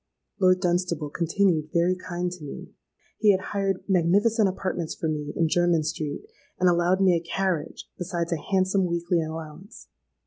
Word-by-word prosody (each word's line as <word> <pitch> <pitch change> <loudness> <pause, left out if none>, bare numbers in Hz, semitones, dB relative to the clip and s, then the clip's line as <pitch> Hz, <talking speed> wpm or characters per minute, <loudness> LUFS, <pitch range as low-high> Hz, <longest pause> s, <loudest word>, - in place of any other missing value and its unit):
Lord 185 -1 +4
Dunstable 175 -4 0
continued 170 -2 +1
very 175 +2 +2
kind 180 -1 -4
to 180 -3 -9
me. 145 - -8 0.5
He 215 - +4
had 190 0 -3
hired 195 -2 -1
magnificent 200 +4 +3
apartments 185 -3 -3
for 160 - -3
me 150 -1 -3
in 165 - +2
Jermyn 175 -1 +2
Street, 150 -1 -4 0.4
and 180 - +3
allowed 175 +2 +3
me 190 -2 +5
a - - +1
carriage, 170 -2 -3
besides 175 -2 -3
a 160 - -3
handsome 190 0 +2
weekly 170 0 0
allowance. 160 +4 -8
175 Hz, 160 wpm, -25 LUFS, 165-185 Hz, 0.5 s, me